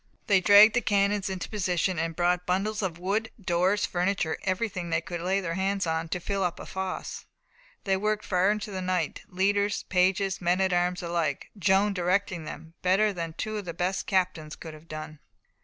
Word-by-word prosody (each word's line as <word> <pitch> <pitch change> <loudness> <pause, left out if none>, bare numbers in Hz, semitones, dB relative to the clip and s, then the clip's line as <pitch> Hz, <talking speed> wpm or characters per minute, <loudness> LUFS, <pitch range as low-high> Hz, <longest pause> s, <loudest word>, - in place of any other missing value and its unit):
They 195 -3 +4
dragged 205 +3 +8
the 245 - +2
cannons 200 -1 +1
into 190 -2 -4
position, 185 -3 0
and 165 0 -2
brought 180 +1 +1
bundles 205 +4 0
of 180 -4 -2
wood, 200 +5 -1
doors, 185 +2 +1
furniture, 175 -2 -1
everything 185 -2 -2
they - - +2
could 175 -2 -6
lay 190 +3 +1
hands 190 +3 -1
on, 160 0 -1
to 180 - -2
fill 195 +2 -2
up 175 -2 0
the - - -9
fosse. 190 -1 -5 0.6
They 195 -1 +2
worked 210 +2 -1
far 185 +1 +2
into 210 0 -1
the 190 -1 -4
night 180 -4 -1
leaders, 200 +2 +1
pages, 190 +1 +2
men 175 +1 +2
at 190 -1 +2
arms 180 0 +1
alike 170 -5 -2
Joan 200 +1 +3
directing 180 -2 0
them 160 +1 -9
"better 200 +3 +3
than 165 -3 -4
two 215 +5 -4
of 205 - -5
the 170 -2 -6
best 180 +2 -1
captains 175 -5 0
could 160 -2 -9
have 155 +1 -14
done." 155 -1 -7
185 Hz, 190 wpm, -27 LUFS, 175-200 Hz, 0.6 s, dragged